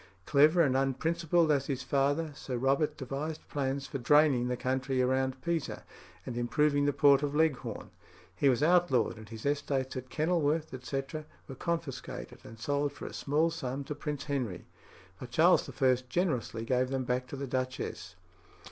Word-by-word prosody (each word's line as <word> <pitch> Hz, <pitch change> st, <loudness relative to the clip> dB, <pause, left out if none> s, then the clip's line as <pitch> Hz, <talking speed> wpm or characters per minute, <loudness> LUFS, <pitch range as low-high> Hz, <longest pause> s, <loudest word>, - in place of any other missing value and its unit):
Clever 155 Hz, +4 st, +5 dB
and 135 Hz, -4 st, +2 dB
unprincipled 160 Hz, +5 st, +1 dB
as 140 Hz, -2 st, +1 dB
his 130 Hz, -2 st, -2 dB
father, 145 Hz, +4 st, +1 dB
Sir 130 Hz, -3 st, -5 dB
Robert 140 Hz, +4 st, +1 dB
devised 145 Hz, +4 st, -5 dB
plans 140 Hz, -1 st, -2 dB
for 140 Hz, -, -5 dB
draining 145 Hz, -2 st, +4 dB
the 125 Hz, 0 st, -1 dB
country 130 Hz, +1 st, -1 dB
round 130 Hz, +1 st, 0 dB
Pisa, 170 Hz, -3 st, -2 dB, 0.4 s
and 125 Hz, -, -5 dB
improving 145 Hz, +4 st, +2 dB
the -, -, +4 dB
port 140 Hz, -1 st, +5 dB
of 145 Hz, 0 st, -2 dB
Leghorn. 155 Hz, -4 st, 0 dB, 0.4 s
He 140 Hz, -, +3 dB
was 130 Hz, +2 st, +2 dB
outlawed, 165 Hz, -10 st, +3 dB
and 110 Hz, -1 st, -12 dB
his 110 Hz, +1 st, -9 dB
estates 140 Hz, -2 st, -1 dB
at 130 Hz, 0 st, -6 dB
Kenilworth, 155 Hz, +1 st, 0 dB
etc. 135 Hz, +4 st, -4 dB, 0.2 s
were 135 Hz, -, -7 dB
confiscated 165 Hz, 0 st, -4 dB
and 115 Hz, -, -11 dB
sold 145 Hz, +4 st, -1 dB
for -, -, -9 dB
a -, -, -7 dB
small 155 Hz, +4 st, +1 dB
sum 140 Hz, -4 st, -4 dB
to 145 Hz, -, -5 dB
Prince 145 Hz, 0 st, -4 dB
Henry; 125 Hz, -, -3 dB, 0.5 s
but 125 Hz, -, -8 dB
Charles 160 Hz, +9 st, +4 dB
I. 130 Hz, -2 st, +3 dB
generously 125 Hz, -8 st, -1 dB
gave 125 Hz, +1 st, +1 dB
them 135 Hz, -1 st, -1 dB
back 125 Hz, +1 st, -1 dB
to -, -, -7 dB
the 140 Hz, 0 st, -4 dB
duchess. 130 Hz, -9 st, -4 dB
140 Hz, 165 wpm, -30 LUFS, 130-150 Hz, 0.5 s, Clever